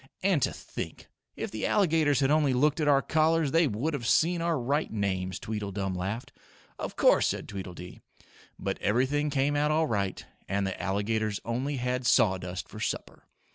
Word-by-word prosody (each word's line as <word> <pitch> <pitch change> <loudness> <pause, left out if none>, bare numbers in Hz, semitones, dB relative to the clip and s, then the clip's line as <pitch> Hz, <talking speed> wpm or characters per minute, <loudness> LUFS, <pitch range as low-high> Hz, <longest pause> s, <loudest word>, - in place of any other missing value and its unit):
"And 185 -6 +3
to - - +2
think, - - -7 0.3
if - - -4
the 110 - -2
alligators 155 -7 +3
had 135 +1 +3
only 150 -3 +3
looked 145 +5 +2
at 150 - +1
our 140 -1 +4
collars, 160 -2 +2
they 165 0 +4
would 130 +8 -2
have 120 -5 -3
seen 170 +6 +3
our 165 -3 +1
right 140 +6 0
names," 95 -3 -2
Tweedledum 100 -3 -3
laughed. 95 +6 -4 0.5
"Of - - -5
course," - - +4
said - - -3
Tweedledee. 90 -2 -8 0.6
But - - -3
everything 130 +7 +1
came 140 +1 +1
out 145 +1 +2
all 160 +1 +2
right 100 -8 -2 0.2
and 100 +1 0
the 95 - -4
alligators 105 +2 -1
only 130 +5 -2
had 125 0 -1
sawdust 95 -7 +2
for - - -10
supper. - - -4
125 Hz, 175 wpm, -28 LUFS, 100-150 Hz, 0.6 s, our